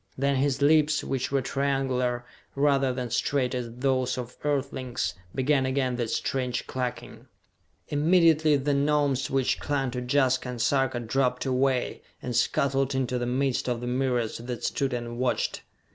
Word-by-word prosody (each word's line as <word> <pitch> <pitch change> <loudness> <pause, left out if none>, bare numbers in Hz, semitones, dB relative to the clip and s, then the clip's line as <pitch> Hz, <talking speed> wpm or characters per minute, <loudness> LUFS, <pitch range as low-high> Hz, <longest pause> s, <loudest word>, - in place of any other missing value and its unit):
Then 140 +1 +1
his 140 +1 +1
lips, 155 0 +4
which 130 -1 -2
were 135 -1 +1
triangular, 130 -3 0 0.3
rather 140 -2 +3
than 125 -2 -4
straight 130 +2 0
as 120 -2 -3
those 130 +1 0
of 125 0 -6
Earthlings, 135 -4 -2 0.2
began 135 +1 +2
again 130 -1 0
that 120 -2 -2
strange 125 0 -1
clucking. 125 -1 -5 0.6
Immediately 160 0 +4
the 140 +1 0
Gnomes 140 -2 +1
which 135 -1 +1
clung 135 -3 -1
to 125 0 -3
Jaska 130 0 +1
and 125 -1 -5
Sarka 135 0 +1
dropped 125 +2 0
away, 130 -1 0 0.2
and 125 -1 -4
scuttled 135 +3 +1
into 125 -1 0
the 120 - -2
midst 130 +1 0
of 120 -1 -1
the 120 - -6
myriads 125 -3 -1
that 120 0 -6
stood 135 -1 0
and 120 -1 -4
watched. 125 -1 0
130 Hz, 155 wpm, -27 LUFS, 125-140 Hz, 0.6 s, lips